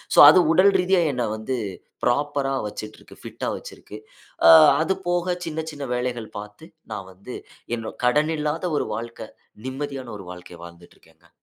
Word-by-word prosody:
So - - +6
அது 180 +4 +7
உடல் 190 +4 +6
ரீதியா, 180 0 +3
என்ன 125 -2 -1
வந்து 110 +4 -3 0.5
ப்ராப்பரா 140 +1 0
வச்சுட்ருக்கு. 105 +1 -10
பிட்டா - - -4
வச்சுருக்கு. 105 - -11 0.5
அ, - - +10 0.3
அது 190 +4 +1
போக, 175 0 0
சின்ன 160 0 -4
சின்ன 145 -2 -6
வேலைகள் 120 -3 -4
பாத்து, 105 +10 -11 0.3
நான் 95 -3 -7
வந்து 100 +7 -10 0.4
என்னோ, 110 -1 -6
கடனில்லாத 150 +4 +1
ஒரு - - -1
வாழ்க்கை. 115 +1 -7 0.4
நிம்மதியான 135 -2 -5
ஒரு 95 - -11
வாழ்க்கய 90 -1 -11
வாழ்ந்துட்டு 85 0 -14
இருக்கேங்க. - - -26
130 Hz, 145 wpm, -23 LUFS, 110-155 Hz, 0.5 s, அ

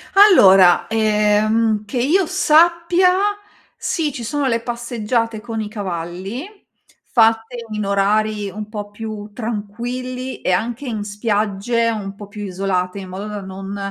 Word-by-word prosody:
Allora, 195 - +7
ehm, 215 0 +2
che 250 - -5
io 345 +10 +3
sappia 340 +4 +4 0.7
sì, 310 -4 -1
ci 240 - -7
sono 280 +4 -1
le 230 -2 +1
passeggiate 235 -1 -2
con 225 0 -5
i 210 - -5
cavalli, 190 - -5 0.6
fatte 225 +1 +2
in 210 -1 -2
orari 205 +1 +1
un 210 +1 -7
po' 205 -1 -6
più 215 -1 -7
tranquilli 245 +4 -5
e - - 0
anche 235 +8 -1
in 220 -3 -3
spiagge 210 +2 0
un 200 -3 -5
po' 205 0 -10
più 205 0 -8
isolate, 185 -1 -2
in 190 - -8
modo 195 +3 -6
da 210 -1 -5
non, 195 +1 -7
215 Hz, 140 wpm, -19 LUFS, 205-240 Hz, 0.7 s, Allora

